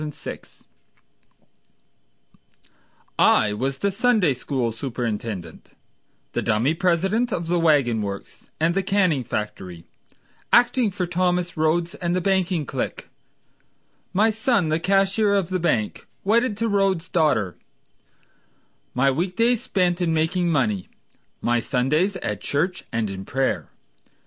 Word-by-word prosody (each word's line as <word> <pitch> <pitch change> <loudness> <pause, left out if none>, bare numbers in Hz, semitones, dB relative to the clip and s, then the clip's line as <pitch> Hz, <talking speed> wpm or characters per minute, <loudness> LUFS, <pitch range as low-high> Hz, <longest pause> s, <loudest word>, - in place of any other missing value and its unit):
Henry 150 -1 -4
Phipps - - -10 2.6
I 105 - +4
was 130 +5 -2
the 200 +7 0
Sunday 210 - +2
school 125 -2 -2
superintendent, 115 - -5 0.6
The - - 0
dummy 115 +6 +1
president 190 +7 +1
of 170 -4 -2
the 175 +1 +1
wagon 140 -9 +3
works 100 -1 -7
And 165 +2 +2
the 195 - +1
canning 185 -8 +1
factory, 95 -6 -5 0.7
Acting 245 -1 +4
for 185 -2 -3
Thomas 180 0 0
Rhodes 165 +3 +1
and 175 -4 -2
the - - +2
banking 185 -4 +1
clique; - - -4 1.0
My 215 +4 +3
son 220 -5 +1
the 155 +1 +1
cashier 195 +3 +2
of 190 -4 0
the 185 -1 -1
bank, 115 -11 -1 0.2
Wedded 225 +1 +2
to 230 +2 0
Rhodes' 195 -4 +1
daughter, 145 - +1 1.4
My 135 +2 +3
week 175 +7 -2
days 235 +2 +2
spent 180 -7 0
in 165 -2 +1
making 170 +3 +1
money, 110 - 0 0.5
My 120 0 +2
Sundays 150 - +1
at 105 -1 -3
church 175 +6 -1
and 115 -1 -1
in 95 -1 -6
prayer. 135 +5 -1
170 Hz, 130 wpm, -23 LUFS, 125-195 Hz, 2.6 s, I